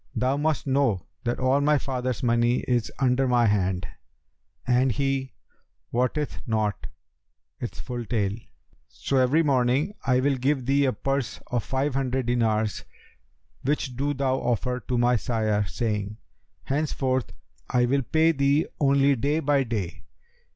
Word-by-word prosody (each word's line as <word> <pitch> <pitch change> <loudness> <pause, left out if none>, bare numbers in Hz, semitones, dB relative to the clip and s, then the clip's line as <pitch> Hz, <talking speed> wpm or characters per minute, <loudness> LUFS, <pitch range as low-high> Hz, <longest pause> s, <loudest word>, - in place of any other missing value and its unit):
Thou 130 +2 +1
must 155 +1 0
know 130 -9 +1 0.2
that 120 - -1
all 130 +2 +2
my 150 +1 +3
father's 130 -3 -3
money 120 0 +2
is 120 -3 -1
under 130 0 +2
my 120 -1 +3
hand 95 -4 +1 0.8
and 125 +1 +3
he 135 +1 -1 0.6
wotteth 125 +5 -1
not 110 -2 -1 0.7
its - - -6
full 120 -1 -5
tale; 105 -4 0 0.5
so, 135 - -2
every 130 +6 +4
morning, 135 +5 +2
I 125 -1 +2
will 135 +1 +1
give 130 0 0
thee 140 +2 +3
a 130 - +2
purse 135 0 -2
of 120 -3 0
five 135 +1 -1
hundred 130 -1 -1
dinars 110 -3 0 0.8
which 135 -2 -1
do 145 +3 -1
thou 130 -1 +1
offer 125 +1 -1
to 125 - 0
my 120 0 +3
sire, 110 -3 0
saying, 105 -2 -2 0.5
'Henceforth, 135 -4 -1 0.4
I 125 -1 +3
will 135 +3 +1
pay 160 +6 +3
thee 140 +1 +2
only 140 -1 +4
day 145 +6 0
by 145 -2 +2
day.' 105 -8 -4
130 Hz, 145 wpm, -25 LUFS, 120-140 Hz, 0.8 s, every